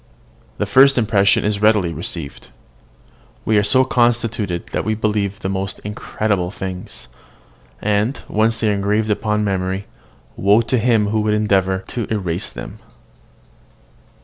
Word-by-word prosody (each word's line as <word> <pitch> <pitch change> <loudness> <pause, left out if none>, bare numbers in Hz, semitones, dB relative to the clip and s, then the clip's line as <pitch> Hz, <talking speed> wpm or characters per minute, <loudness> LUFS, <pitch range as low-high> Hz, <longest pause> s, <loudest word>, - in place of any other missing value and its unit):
The 105 - -1
first 135 +6 +5
impression 105 -5 +3
is 105 -1 -1
readily 105 -6 +3
received. 80 -2 -5 1.0
We 110 - +2
are - - +1
so 130 +5 +3
constituted 115 -7 0
that - - -1
we 110 0 -1
believe 105 -2 -1
the - - -3
most 95 0 -3
incredible 105 -2 -2
things; 95 -7 -7 0.8
and, 105 +5 0
once 110 +1 +1
they 110 -2 +1
are - - +1
engraved 105 +2 0
upon 105 0 0
the 105 -1 0
memory, 95 +1 -2 0.5
woe 100 +4 +4
to 120 +2 0
him 110 -3 +2
who 110 0 +1
would 105 0 +1
endeavour 95 -3 +1
to 120 -4 -3
efface 95 -3 -2
them. - - -9
105 Hz, 145 wpm, -19 LUFS, 95-110 Hz, 1.0 s, first